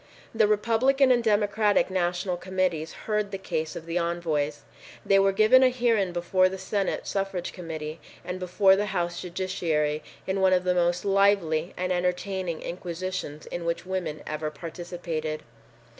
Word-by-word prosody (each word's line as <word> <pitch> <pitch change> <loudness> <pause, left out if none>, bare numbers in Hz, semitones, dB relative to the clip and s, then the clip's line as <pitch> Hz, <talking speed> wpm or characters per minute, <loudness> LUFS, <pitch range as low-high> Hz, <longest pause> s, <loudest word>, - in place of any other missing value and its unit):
The 220 -2 +4
Republican 240 +6 +3
and 240 -1 +3
Democratic 210 -2 +2
National 180 0 0
Committees 180 -3 -1
heard 210 -1 0
the 195 - -4
case 160 -4 -3
of 165 - -7
the 170 +1 -1
envoys. 160 -4 -1 0.4
They 195 0 +5
were 195 0 +4
given 215 +6 +6
a 260 - +6
hearing 230 -7 +1
before 180 +2 +2
the 190 - -5
Senate 190 +1 -2
Suffrage 195 -3 -2
Committee 160 -2 -6 0.3
and 180 +1 -4
before 190 +1 +4
the 205 +1 -1
House 175 0 -2
Judiciary 170 -5 -1 0.2
in 190 0 -1
one 190 0 +5
of 180 0 +3
the 180 0 +2
most 175 +1 +1
lively 195 -5 +2
and 185 0 -1
entertaining 180 -1 -1
inquisitions 175 -3 -5
in 175 - -5
which 170 +1 -2
women 180 -5 -3
ever 155 0 -3
participated. 160 0 -5
180 Hz, 155 wpm, -26 LUFS, 170-195 Hz, 0.4 s, given